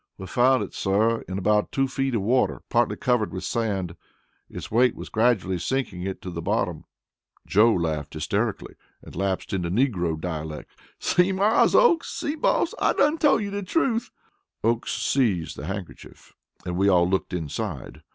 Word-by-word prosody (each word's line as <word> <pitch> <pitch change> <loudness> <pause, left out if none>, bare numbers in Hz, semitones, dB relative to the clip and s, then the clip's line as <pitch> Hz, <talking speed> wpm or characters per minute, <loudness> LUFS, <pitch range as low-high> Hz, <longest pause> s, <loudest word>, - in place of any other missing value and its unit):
"We 95 - -8
found 125 +6 +3
it, - - -8
sir, 110 +4 +1
in 95 - -4
about 105 +2 +1
two 135 0 +1
feet 135 -1 -1
of 105 - 0
water, 125 +5 +1
partly 120 0 +2
covered 120 -5 0
with 95 - -5
sand. 100 -7 -2 0.5
Its - - -8
weight 125 +3 +3
was - - -8
gradually 110 -6 +1
sinking 105 -2 -2
it 95 +1 -3
into 90 - -4
the 85 -1 -5
bottom." - - -1 0.6
Joe 110 +4 +4
laughed 80 -5 -2
hysterically 100 +8 -2 0.3
and - - -12
lapsed 95 +2 -2
into 90 -3 -1
negro 90 - 0
dialect: 80 -3 -5 0.3
"See, 180 +2 +2
Mars 200 +4 +3
Oakes! 345 -10 +4
see, 290 - -3
boss! 310 - +1
I - - +3
dun 300 +3 +2
tole 295 -6 +4
you 200 -1 -4
the 200 0 -3
truth." 235 - 0 0.5
Oakes 115 +1 0
seized 105 - 0
the 75 - -7
handkerchief, 100 -2 -8 0.3
and 90 -1 -3
we 100 +1 +3
all 90 -2 +4
looked 95 +1 -1
inside. 85 - -5
105 Hz, 170 wpm, -25 LUFS, 90-130 Hz, 0.6 s, Joe